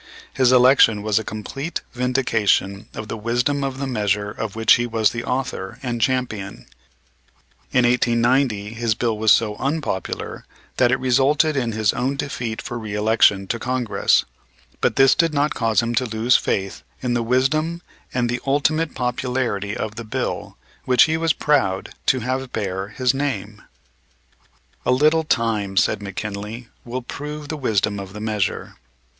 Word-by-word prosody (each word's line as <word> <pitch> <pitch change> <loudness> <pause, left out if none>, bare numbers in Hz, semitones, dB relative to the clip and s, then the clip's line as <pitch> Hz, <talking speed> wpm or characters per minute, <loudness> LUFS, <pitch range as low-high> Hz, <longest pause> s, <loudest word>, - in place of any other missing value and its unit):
His 130 -1 +3
election 125 -4 +5
was 110 0 +2
a - - -5
complete 135 +10 -5
vindication 115 -6 0
of 110 - -6
the 110 - -4
wisdom 120 +6 0
of 135 -1 -3
the 140 - -3
measure 105 -4 -1
of 110 -1 -5
which 115 0 +5
he 120 0 +1
was 110 -2 +2
the 115 0 -4
author 125 -5 -3
and 120 -2 -3
champion. 110 - -2 1.1
In 125 -1 +3
1890 120 -3 +2
his 115 -1 0
bill 115 0 0
was 110 0 +3
so 105 -2 +3
unpopular 135 -8 -3 0.3
that 125 -1 +4
it 130 - +2
resulted 135 +4 +2
in 120 -4 -1
his 110 -1 +1
own 130 +3 -1
defeat 125 -6 -4
for 120 - -5
reëlection 105 -2 +2
to 115 - -1
Congress. 120 -5 +1 0.5
But - - +1
this 135 -1 +6
did 165 -3 +1
not 145 +1 +1
cause 115 -1 +1
him 115 0 -2
to 125 +2 +1
lose 115 +3 +2
faith 95 0 -1 0.2
in 125 -1 0
the 120 - +1
wisdom 155 +8 0 0.3
and 125 -1 0
the 120 +1 -2
ultimate 150 +3 +1
popularity 125 -5 -2
of 110 0 -4
the 115 - -5
bill 110 - -4 0.3
which 125 -2 +5
he 160 - +1
was 165 0 +1
proud 100 -11 0
to 130 - +3
have 130 +2 -3
bear 95 -2 -3
his 125 +3 0
name. 110 -7 -3 1.2
"A - - +1
little 155 +5 +3
time," 110 -8 0
said 100 - +2
McKinley, 105 +4 -6 0.2
"will 125 +1 -4
prove 150 +3 -7
the 155 - -2
wisdom 105 -7 0
of 95 -1 -8
the 105 - -7
measure." 105 -2 -2
120 Hz, 160 wpm, -21 LUFS, 105-130 Hz, 1.2 s, this